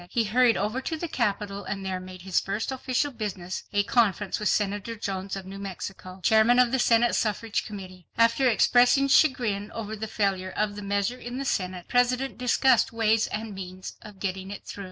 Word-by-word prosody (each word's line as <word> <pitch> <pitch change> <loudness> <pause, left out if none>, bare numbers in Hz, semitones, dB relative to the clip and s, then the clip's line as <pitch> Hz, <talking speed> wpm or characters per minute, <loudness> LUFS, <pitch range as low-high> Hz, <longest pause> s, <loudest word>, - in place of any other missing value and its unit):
He 235 - +1
hurried 235 +2 +3
over 215 +6 -1
to 320 +4 -3
the 340 - -4
Capitol, 205 -6 -2
and 195 -1 -5
there 185 -1 -2
made 185 -1 -10
his 190 -2 +1
first 205 +6 -3
official 265 +2 -1
business 195 -6 -5
a 205 -1 +2
conference 205 -3 +1
with 210 - +1
Senator 205 +2 -1
Jones 195 -2 -4
of 195 -1 -7
New 195 +1 -8
Mexico, 190 -1 -7
Chairman 220 +2 +5
of 250 -1 +5
the 265 - +1
Senate 240 0 +4
Suffrage 215 0 -1
Committee. 185 -4 -9
After 230 +3 +4
expressing 245 +5 +4
chagrin 230 -9 +2
over 220 -1 -5
the 220 +1 -5
failure 195 -3 -1
of 210 -1 0
the 205 - -6
measure 200 +4 -1
in 245 +1 -6
the 275 - -3
Senate, 185 -6 -2
the - - -16
President 250 +2 +1
discussed 250 +1 +3
ways 225 -1 +2
and 220 0 -5
means 185 -1 -7
of 210 -3 -13
getting 190 -1 -3
it 200 - -8
through. - - -8
210 Hz, 195 wpm, -26 LUFS, 195-240 Hz, -, Chairman